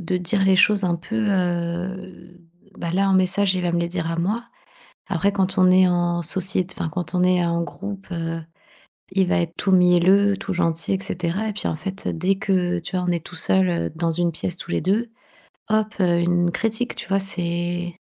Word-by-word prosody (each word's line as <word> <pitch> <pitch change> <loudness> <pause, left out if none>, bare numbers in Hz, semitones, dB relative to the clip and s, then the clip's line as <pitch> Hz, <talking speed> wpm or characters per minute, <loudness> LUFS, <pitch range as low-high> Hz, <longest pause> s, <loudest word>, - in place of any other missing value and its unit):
de 180 +1 -1
dire 190 +3 0
les 190 - +5
choses 200 0 +4
un 175 -1 +1
peu, 220 +5 -3
heu, 180 0 -3 0.4
bah 170 0 -3
là, 195 +1 +2
en - - +3
message, 190 +1 +2
il 180 - -2
va 175 - 0
me 170 - +1
les 170 - -1
dire 170 -2 -3
à 165 - -2
moi. 210 +8 -1 0.6
Après, 195 +2 +1
quand 190 -1 0
on 185 0 +6
est 185 0 +6
en 175 -1 +1
sociét 185 +2 0
enfin 160 - -2
quand 180 0 -5
on 180 - +2
est 180 -1 +3
en 170 0 0
groupe, 200 +2 -7
heu, 165 -1 -3 0.7
il 190 -1 +2
va - - +2
être 165 -1 -3
tout 195 - 0
mielleux, 185 +2 +5
tout 195 - -5
gentil 165 0 0
et 190 - 0
cetera 185 +5 -2
et - - -3
puis 205 - -3
en - - -1
fait, 190 +5 -6
dès 185 +4 0
que, 185 -3 0
tu 170 +3 -7
vois, 180 - -1
on - - +2
est 170 -2 -2
tout 180 - -9
seul, 185 +2 +2
heu, 170 - -1
dans 165 0 0
une 170 +1 0
pièce 175 +2 -4
tous 175 - -7
les - - 0
2, 220 +5 0 0.6
hop, 215 0 +1
heu, 175 -2 +3
une 175 0 +2
critique, 225 +4 -2
tu - - -6
vois? 195 0 +2
C'est 175 -2 -3
180 Hz, 220 wpm, -22 LUFS, 170-195 Hz, 0.7 s, on